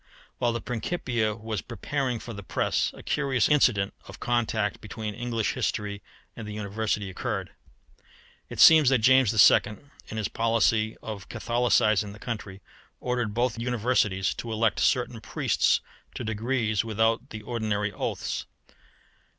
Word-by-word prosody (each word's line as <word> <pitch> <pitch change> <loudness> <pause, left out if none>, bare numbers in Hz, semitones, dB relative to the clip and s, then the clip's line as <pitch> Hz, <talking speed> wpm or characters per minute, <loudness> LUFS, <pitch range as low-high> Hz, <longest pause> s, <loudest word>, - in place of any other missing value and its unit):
While 120 - +2
the 115 0 -3
Principia 120 -3 -2
was 110 -2 -4
preparing 125 +3 -3
for 115 +1 -8
the 100 - -7
press 95 - 0
a - - -12
curious 140 -4 +1
incident 115 -9 +3
of 100 +3 -11
contact 110 -3 0
between 110 0 -5
English 115 -1 -2
history 100 -1 -2 0.3
and 110 - -7
the 105 - -6
University 105 0 -2
occurred. 95 - -4 1.0
It - - -8
seems 155 -5 +8
that 135 - +4
James 130 -1 +5
II., 105 -1 +5 0.3
in 110 - -7
his 110 - -1
policy 115 -1 +1
of 105 -4 -7
Catholicising 110 -3 +1
the - - -12
country, 105 -4 -6 0.4
ordered 125 -4 -2
both 120 -1 0
Universities 115 -5 +1
to 115 - -6
elect 110 0 +1
certain 120 -2 +1
priests - - +1 0.3
to - - -4
degrees 110 -1 0
without 110 0 0
the 105 -1 -8
ordinary 105 -3 -2
oaths. - - -3
110 Hz, 140 wpm, -27 LUFS, 105-120 Hz, 1.0 s, seems